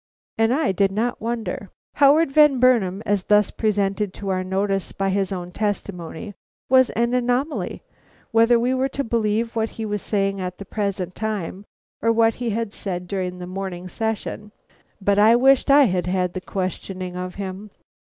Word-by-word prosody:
And 225 Hz, +1 st, +2 dB
I 270 Hz, -6 st, +2 dB
did 195 Hz, +1 st, +2 dB
not 230 Hz, +5 st, -2 dB
wonder. 225 Hz, -3 st, -4 dB, 0.3 s
Howard 285 Hz, +1 st, +5 dB
Van 295 Hz, -2 st, +5 dB
Burnam, 220 Hz, -6 st, +3 dB
as 200 Hz, -2 st, 0 dB
thus 210 Hz, -1 st, +3 dB
presented 205 Hz, -2 st, -1 dB
to 200 Hz, -, -5 dB
our 185 Hz, -1 st, 0 dB
notice 195 Hz, -1 st, -1 dB
by 195 Hz, 0 st, -1 dB
his 195 Hz, 0 st, 0 dB
own 180 Hz, -2 st, -5 dB
testimony, 200 Hz, -2 st, -4 dB, 0.4 s
was 260 Hz, -1 st, +5 dB
an 235 Hz, +2 st, +1 dB
anomaly, 250 Hz, +4 st, -1 dB, 0.5 s
whether 230 Hz, +1 st, +5 dB
we 245 Hz, +2 st, +1 dB
were 260 Hz, +1 st, 0 dB
to 280 Hz, +1 st, -3 dB
believe 230 Hz, 0 st, 0 dB
what 225 Hz, 0 st, 0 dB
he 225 Hz, -, -3 dB
was 210 Hz, -1 st, -2 dB
saying 195 Hz, -2 st, -1 dB
at 180 Hz, -1 st, -4 dB
the 200 Hz, -, -8 dB
present 195 Hz, -3 st, -3 dB
time 205 Hz, -2 st, -4 dB, 0.4 s
or 230 Hz, -, +3 dB
what 225 Hz, 0 st, +3 dB
he 240 Hz, -, 0 dB
had 225 Hz, -1 st, -2 dB
said 180 Hz, -2 st, -5 dB
during 185 Hz, -1 st, -3 dB
the 180 Hz, -, -7 dB
morning 185 Hz, -1 st, -5 dB
session. 215 Hz, 0 st, -4 dB, 0.5 s
But 200 Hz, 0 st, +2 dB
I 220 Hz, +3 st, +7 dB
wished 265 Hz, +3 st, +4 dB
I 285 Hz, +1 st, +7 dB
had 180 Hz, -7 st, 0 dB
had 180 Hz, -1 st, 0 dB
the 185 Hz, -, -4 dB
questioning 185 Hz, -1 st, -4 dB
of 180 Hz, 0 st, -5 dB
him. 195 Hz, +1 st, -6 dB
205 Hz, 175 wpm, -22 LUFS, 190-230 Hz, 0.5 s, I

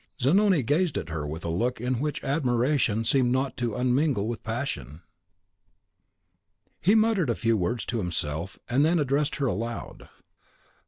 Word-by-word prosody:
Zanoni 180 Hz, +4 st, +3 dB
gazed 150 Hz, +5 st, +1 dB
at 80 Hz, -, -4 dB
her 75 Hz, -2 st, -3 dB
with 80 Hz, +3 st, -6 dB
a 85 Hz, -, -1 dB
look 120 Hz, +9 st, -1 dB
in 125 Hz, +1 st, -1 dB
which 150 Hz, +2 st, -3 dB
admiration 125 Hz, -4 st, +1 dB
seemed 125 Hz, +1 st, +3 dB
not 130 Hz, 0 st, -1 dB
unmingled 125 Hz, 0 st, +1 dB
with 115 Hz, -1 st, -4 dB
compassion. 85 Hz, -, -4 dB, 1.8 s
He 200 Hz, +6 st, +4 dB
muttered 215 Hz, -, +3 dB
a 115 Hz, -, +1 dB
few 115 Hz, -1 st, +1 dB
words 100 Hz, +4 st, -1 dB
to 120 Hz, -, -2 dB
himself, 85 Hz, -1 st, -3 dB
and 130 Hz, +4 st, +2 dB
then 165 Hz, +3 st, +3 dB
addressed 145 Hz, 0 st, +1 dB
her 140 Hz, -, -1 dB
aloud. 115 Hz, +1 st, -4 dB
125 Hz, 150 wpm, -26 LUFS, 110-145 Hz, 1.8 s, He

